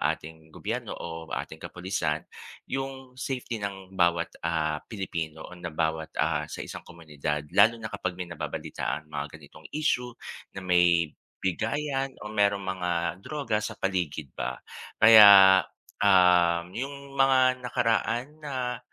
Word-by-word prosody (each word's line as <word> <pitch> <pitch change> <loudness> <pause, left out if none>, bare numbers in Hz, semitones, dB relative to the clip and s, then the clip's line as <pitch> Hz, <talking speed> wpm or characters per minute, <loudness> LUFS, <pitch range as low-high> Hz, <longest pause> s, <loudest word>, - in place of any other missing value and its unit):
ating 80 +1 -12
gobyerno - - -4
o 80 -1 -7
ating - - -5
kapulisan, 90 -4 -2 0.4
yung 135 -1 -5
safety 125 -3 -3
ng 95 -1 -6
bawat, 85 -1 +2
ah, 80 -2 0
Pilipino 85 -7 -5
o 90 - -11
na 85 -2 -5
bawat, 80 0 -2
ah, - - +1
sa - - -8
isang - - -8
komunidad. 75 -2 -4
Lalo 115 +2 +6
na 110 - -5
kapag 90 - -3
may 90 - -4
nababalitaan 75 -2 -4
mga 70 +1 -3
ganitong 75 +2 -16
isyu 125 -5 0 0.4
na - - -4
may 85 -3 +3 0.3
bigayan 135 - -1
o 105 - -6
merong 100 -1 +2
mga 90 -2 -2
droga 115 -2 -2
sa 110 +1 -5
paligid 85 -8 -2
ba, 65 - -4 0.5
kaya, 100 -4 +10 0.4
um, 90 -3 +4
yung 140 +4 -6
mga 130 -1 +4
nakaraan 120 0 0
na, 130 -4 -3
95 Hz, 135 wpm, -27 LUFS, 85-125 Hz, 0.5 s, kaya